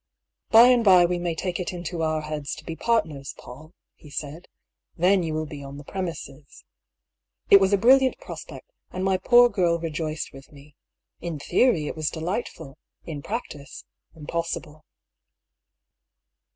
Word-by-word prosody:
"By 230 +2 +8
and 245 -2 +4
by 185 -4 +7
we 175 0 -1
may 175 -1 -2
take 180 +1 -3
it 180 - -3
into 175 -1 -5
our 155 -1 0
heads 150 -2 -5
to 155 - -12
be 165 - -5
partners, 160 -12 -1
Paull," 155 +7 -13 0.2
he 150 - -17
said. 150 +4 -7 0.2
" - - -55
Then 185 +3 +3
you 160 -2 -3
will 155 0 -2
be 145 -2 -9
on 140 0 -9
the 145 - -10
premises." 155 -5 -7 0.9
It 200 - +10
was 190 0 +3
a 200 - +4
brilliant 260 +5 +4
prospect, - - -10 0.2
and 185 - -5
my 190 -1 +2
poor 245 +4 +6
girl 180 -7 +1
rejoiced 160 -1 -4
with 135 0 -14
me. 145 0 -17 0.4
In 170 -3 -5
theory, 160 - +2
it - - -5
was 155 -2 -1
delightful; 160 - -5 0.2
in 150 -3 -7
practice, 145 - -7 0.3
im 155 -2 -11
possible. 155 -2 -5
165 Hz, 165 wpm, -24 LUFS, 150-190 Hz, 0.9 s, It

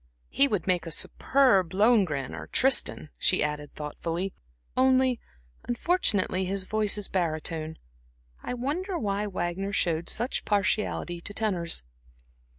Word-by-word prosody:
He 280 - +4
would 205 -10 -1
make 180 -2 +1
a - - -3
superb 195 - +2
Lohengrin 195 - +3
or - - -7
Tristan," 260 - +2
she - - +3
added, 150 -1 -4
thoughtfully 165 +5 -4 0.4
"only, 260 -1 +3 0.5
unfortunately, 235 - +1
his 195 +1 -1
voice 210 +1 0
is 205 - -2
barytone. 160 -2 -2 0.6
I 250 - -4
wonder 340 +10 -2
why 205 -3 -1
Wagner 190 +1 -3
showed 170 -3 0
such 240 +4 0
partiality 200 -4 0
to 205 - -5
tenors." 180 - 0
195 Hz, 125 wpm, -27 LUFS, 170-240 Hz, 0.6 s, He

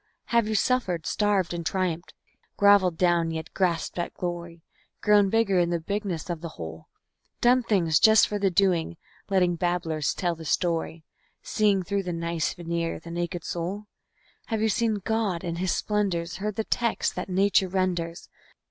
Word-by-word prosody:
Have 235 -2 +4
you 215 - -1
suffered, 200 -9 0
starved 205 -4 +1
and 170 -1 -4
triumphed, 175 -1 -2 0.4
groveled 200 -4 +5
down, 175 -2 +2
yet 160 -1 -5
grasped 180 -2 -1
at 170 - -3
glory, 170 -2 -5 0.4
Grown 205 -2 +4
bigger 200 -3 +2
in 170 -1 +2
the 170 -1 0
bigness 195 -1 -3
of 170 -3 -4
the 170 - -5
whole? 80 -1 -8 0.5
"Done 250 +1 +4
things" 180 -9 +2
just 220 -1 +6
for 210 - -3
the 195 -1 +2
doing, 175 -3 +1 0.3
letting 180 -3 +2
babblers 165 -4 -1
tell 175 -2 0
the 165 0 -10
story, 165 0 -1 0.4
Seeing 205 -3 +2
through 200 +2 -1
the 180 -2 -4
nice 170 -1 -2
veneer 170 -1 -3
the 170 +1 -10
naked 175 0 -3
soul? 185 +5 -4 0.6
Have 225 -2 -1
you 220 - +3
seen 225 +1 +1
God 220 -6 0
in 170 -2 -3
His 185 +1 0
splendors, 190 -5 -1
heard 210 +2 -3
the 220 - -1
text 235 +1 0
that - - -4
nature 190 +1 +3
renders? 180 -2 -2
180 Hz, 165 wpm, -26 LUFS, 170-205 Hz, 0.6 s, just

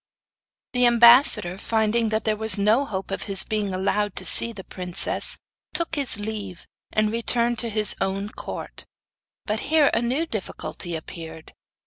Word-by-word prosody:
The 250 -1 +4
ambassador, 235 - +5
finding 220 +1 0
that 220 0 -1
there 215 -1 0
was 220 -1 +4
no 215 +7 +2
hope 195 -5 -5
of 195 - -4
his 195 -1 +6
being 210 -2 -2
allowed 200 +2 -1
to - - -3
see 230 - +4
the 200 -4 -10
princess, 180 -2 -1 0.4
took 335 -1 -1
his 280 -8 0
leave, 205 -4 -6 0.3
and 215 0 +1
returned 235 +1 0
to 235 - -2
his 215 -1 +1
own 195 +1 -2
court; - - -8 0.6
but 215 +1 -2
here 310 -2 +4
a 230 - +1
new 260 +7 -1
difficulty 190 - -5
appeared. 160 0 -9
215 Hz, 155 wpm, -23 LUFS, 195-235 Hz, 0.6 s, his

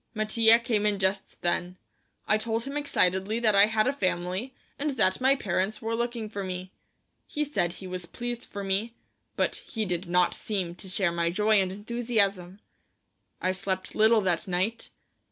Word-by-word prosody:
Mattia 220 +1 +5
came 230 -3 0
in 205 -1 +1
just 190 0 -1
then. 180 +1 0 0.5
I 215 - +3
told 225 +1 -1
him 275 +3 -6
excitedly 200 -7 +1
that 220 -3 +3
I 200 +1 +7
had 220 -1 +2
a 265 - +1
family, 185 +2 -2 0.2
and 295 +2 0
that 190 +5 +3
my 265 +1 +5
parents 195 -3 -1
were 225 0 -3
looking 235 -1 -2
for 205 -2 -5
me. 185 0 -5 0.6
He 300 - -1
said 175 - 0
he 190 - -10
was 180 -1 -5
pleased 240 +5 -5
for 200 -1 -7
me, 200 +5 -1 0.4
but - - 0
he 220 -2 -4
did 180 -1 -3
not 180 0 +3
seem 190 -5 -3
to 185 +2 -10
share 185 -1 +1
my 170 0 0
joy 210 +3 +3
and 185 -1 -1
enthusiasm. 205 -3 -1 0.8
I 185 - +2
slept 185 0 -3
little 220 +1 +5
that 180 0 0
night. 190 +6 -1
205 Hz, 175 wpm, -27 LUFS, 185-230 Hz, 0.8 s, I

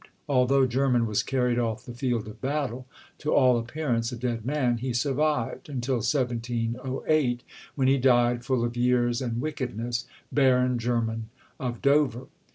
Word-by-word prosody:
Although 135 0 +3
Jermyn 125 -1 +2
was 105 -2 +1
carried 125 -2 0
off 115 -3 -2
the 120 - -8
field 120 -3 -1
of 110 +1 -11
battle, 130 -3 -2 0.3
to 150 - -2
all 125 -3 +5
appearance 120 -1 -2
a - - -4
dead 120 -2 -3
man, 130 -2 +1
he 125 +1 -2
survived 135 +1 0
until 130 -2 -1
1708 120 +2 -1 0.3
when 135 -2 +2
he 135 +1 +4
died, 120 -1 +3
full 130 -3 0
of 120 0 -4
years 120 0 +2
and 120 -2 -2
wickedness, 120 -5 -3 0.2
Baron 125 -3 +3
Jermyn 115 -1 -1 0.3
of 120 -3 -4
Dover. 140 -3 +2
125 Hz, 150 wpm, -27 LUFS, 120-135 Hz, 0.3 s, all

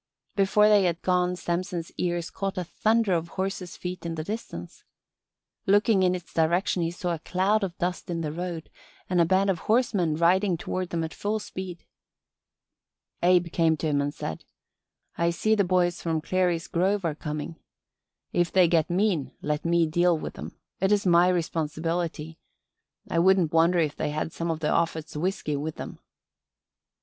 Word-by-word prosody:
Before 200 +2 +4
they 205 -2 +5
had 170 -1 -1
gone 180 -1 +2
Samson's 175 -1 -3
ears 175 -2 -2
caught 195 0 -3
a 180 - -1
thunder 220 +3 +1
of 170 -1 0
horses' 190 -1 -3
feet 180 0 -6
in 165 -1 -3
the 155 - -4
distance. 160 - -7 0.8
Looking 205 +1 +4
in 185 -1 +3
its 180 -1 -9
direction 170 +3 +1
he 165 - 0
saw 175 0 -3
a 165 - -4
cloud 195 +6 +1
of 185 -2 -4
dust 180 0 -3
in 170 -1 -2
the 155 -2 -2
road 170 0 -5 0.4
and 180 -1 +4
a - - +5
band 190 +3 +3
of 175 - -3
horsemen 210 -8 +1
riding 180 +3 +3
toward 185 +2 -3
them 165 -1 -2
at 160 -2 -5
full 210 +2 -2
speed. 185 -4 -7 1.4
Abe 175 -1 +3
came 165 -2 +3
to 160 - -4
him 145 -2 +1
and 145 0 -1
said: 80 - -6 0.8
"I 170 0 +3
see 215 +6 +1
the 210 -2 +3
boys 180 -1 +1
from 165 -2 0
Clary's 175 0 0
Grove 190 +2 0
are 160 - 0
coming. 150 +2 -5 0.8
If 175 -1 +1
they 185 -2 +5
get 165 -2 +2
mean 180 -5 0
let 150 0 -1
me 170 0 +3
deal 175 +2 +2
with - - -6
'em. - - -8 0.2
It's 200 +2 +2
my 175 0 +5
responsibility. 165 -1 -2 0.7
I 165 - 0
wouldn't 185 -2 +4
wonder 165 +2 +4
if 155 -3 +1
they 150 - -1
had 155 +2 -3
some 170 0 -3
of 160 -1 -3
Offut's 160 0 0
whisky 155 -2 -1
with 150 +2 -3
them." - - -8
175 Hz, 175 wpm, -26 LUFS, 165-185 Hz, 1.4 s, they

